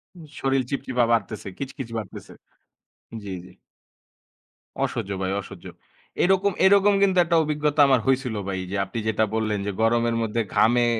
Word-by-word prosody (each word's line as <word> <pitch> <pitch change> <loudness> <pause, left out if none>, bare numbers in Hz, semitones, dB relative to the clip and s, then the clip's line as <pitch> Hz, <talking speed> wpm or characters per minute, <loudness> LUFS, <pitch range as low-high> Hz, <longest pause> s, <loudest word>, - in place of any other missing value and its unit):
উম 170 - -12 0.2
শরীল 135 -1 +1
চিপচিপা 130 -3 -1
বাড়তেছে। 115 -3 -1
কিচকিচ 135 -3 -6
বাড়তেছে। 105 -4 -8 0.9
জ্বী, 100 -1 -6
জ্বী। 90 - -15 1.3
অসহ্য 100 - -3
ভাই, 95 0 -1
অসহ্য। 95 -2 -12 0.6
এরকম, 190 +2 +3
এরকম 200 +1 +5
কিন্তু 190 -2 +2
একটা 170 0 +1
অভিজ্ঞতা 150 0 +1
আমার 130 -3 +4
হইছিল 130 -4 +1
ভাই 95 -1 -2
যে, - - -2
আপনি 95 - -8
যেটা 110 0 +1
বললেন 110 -2 -1
যে, 105 - -1
গরমের 115 +1 +2
মধ্যে 115 +1 -1
ঘামে 120 +2 +4
120 Hz, 145 wpm, -24 LUFS, 110-150 Hz, 1.3 s, এরকম